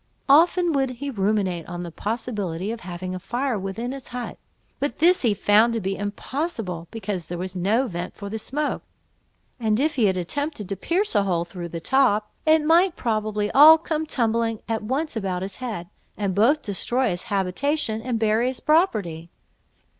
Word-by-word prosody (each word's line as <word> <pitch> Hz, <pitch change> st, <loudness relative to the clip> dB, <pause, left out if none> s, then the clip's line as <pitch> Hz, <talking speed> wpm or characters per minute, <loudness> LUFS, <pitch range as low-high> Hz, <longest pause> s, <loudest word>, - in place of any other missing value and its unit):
Often 340 Hz, +4 st, +5 dB
would 270 Hz, -2 st, +1 dB
he 285 Hz, +2 st, -4 dB
ruminate 195 Hz, -, 0 dB
on 175 Hz, 0 st, -5 dB
the 170 Hz, -, -7 dB
possibility 205 Hz, -3 st, -3 dB
of 230 Hz, -, -5 dB
having 180 Hz, 0 st, -6 dB
a 185 Hz, -, -4 dB
fire 245 Hz, +2 st, -2 dB
within 195 Hz, +6 st, -4 dB
his 270 Hz, -1 st, -7 dB
hut, 245 Hz, 0 st, -6 dB, 0.4 s
but 285 Hz, -, -2 dB
this 355 Hz, +4 st, +4 dB
he 225 Hz, -5 st, +2 dB
found 215 Hz, +4 st, +4 dB
to 230 Hz, -, 0 dB
be 195 Hz, -1 st, -2 dB
impossible, 205 Hz, -, -4 dB
because 195 Hz, -6 st, -4 dB
there 175 Hz, -, -5 dB
was 185 Hz, +1 st, -5 dB
no 210 Hz, +8 st, +1 dB
vent 175 Hz, -5 st, -5 dB
for 200 Hz, -, -7 dB
the 220 Hz, +2 st, -4 dB
smoke; 295 Hz, +7 st, -2 dB, 0.8 s
and 220 Hz, -1 st, +1 dB
if 300 Hz, +1 st, 0 dB
he 235 Hz, -, +4 dB
had 190 Hz, -2 st, +2 dB
attempted 285 Hz, -, -3 dB
to 195 Hz, -, -1 dB
pierce 360 Hz, -, 0 dB
a 205 Hz, -, +4 dB
hole 175 Hz, -4 st, 0 dB
through 175 Hz, -1 st, -7 dB
the 170 Hz, -, -5 dB
top, 215 Hz, -1 st, +2 dB, 0.2 s
it 315 Hz, -1 st, +5 dB
might 340 Hz, +3 st, +4 dB
probably 215 Hz, -2 st, -1 dB
all 310 Hz, +3 st, +9 dB
come 315 Hz, -1 st, -3 dB
tumbling 230 Hz, -4 st, 0 dB
at 225 Hz, -1 st, -1 dB
once 270 Hz, +8 st, -2 dB
about 190 Hz, -4 st, -2 dB
his 190 Hz, 0 st, -5 dB
head, 220 Hz, -9 st, -5 dB, 0.3 s
and 200 Hz, -2 st, -1 dB
both 245 Hz, +11 st, +3 dB
destroy 240 Hz, +5 st, 0 dB
his 175 Hz, 0 st, -4 dB
habitation 220 Hz, +5 st, 0 dB
and 245 Hz, -1 st, -2 dB
bury 220 Hz, +2 st, +2 dB
his 260 Hz, 0 st, -3 dB
property. 205 Hz, -, +1 dB
220 Hz, 185 wpm, -24 LUFS, 190-270 Hz, 0.8 s, all